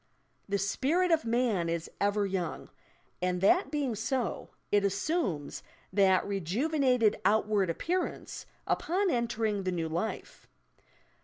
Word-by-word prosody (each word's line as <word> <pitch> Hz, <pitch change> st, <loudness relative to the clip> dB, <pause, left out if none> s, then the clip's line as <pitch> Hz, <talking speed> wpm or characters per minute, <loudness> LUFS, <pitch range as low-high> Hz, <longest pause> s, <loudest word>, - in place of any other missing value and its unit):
"The 200 Hz, -, +1 dB
spirit 280 Hz, -, +1 dB
of 320 Hz, -5 st, +3 dB
man 225 Hz, -7 st, +1 dB
is 165 Hz, 0 st, -2 dB
ever 205 Hz, 0 st, +2 dB
young," 185 Hz, -4 st, -3 dB, 0.5 s
and 180 Hz, 0 st, 0 dB
that 360 Hz, -, +4 dB
being 285 Hz, -5 st, -1 dB
so, 230 Hz, 0 st, -2 dB, 0.2 s
it 205 Hz, -1 st, +4 dB
assumes 200 Hz, -, -1 dB, 0.3 s
that 190 Hz, -1 st, +4 dB
rejuvenated 230 Hz, -, +1 dB
outward 205 Hz, -1 st, +2 dB
appearance, 350 Hz, -, -3 dB, 0.2 s
upon 375 Hz, +2 st, +1 dB
entering 225 Hz, -4 st, 0 dB
the 185 Hz, -1 st, -1 dB
new 165 Hz, -2 st, -2 dB
life. 170 Hz, +7 st, -4 dB
210 Hz, 115 wpm, -30 LUFS, 190-260 Hz, 0.5 s, that